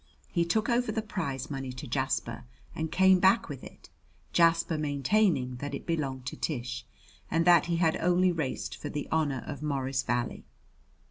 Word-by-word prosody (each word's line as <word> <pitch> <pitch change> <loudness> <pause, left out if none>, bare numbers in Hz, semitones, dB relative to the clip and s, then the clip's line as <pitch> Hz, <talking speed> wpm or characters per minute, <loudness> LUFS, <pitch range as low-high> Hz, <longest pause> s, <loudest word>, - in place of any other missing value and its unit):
He 170 - +1
took 215 +5 +1
over 240 -1 +1
the 220 0 -2
prize 145 - -4
money 135 -2 -4
to 125 - -7
Jasper - - -2 0.3
and 160 0 -3
came 190 0 +5
back 200 +5 +4
with 140 -3 -7
it, - - -13 0.4
Jasper 165 -1 +4
maintaining 145 - +1
that 140 +2 -4
it - - -8
belonged 135 -6 -2
to - - -4
Tish, 125 -4 -4 0.4
and 165 0 +1
that 175 -2 +6
he 170 - +1
had 165 -1 +2
only 180 +1 +3
raced 155 -6 -3
for 145 - -6
the 145 -1 -4
honor 145 -5 0
of 145 -2 -6
Morris 135 -3 -1
Valley. 120 -1 -2
155 Hz, 175 wpm, -29 LUFS, 135-175 Hz, 0.4 s, that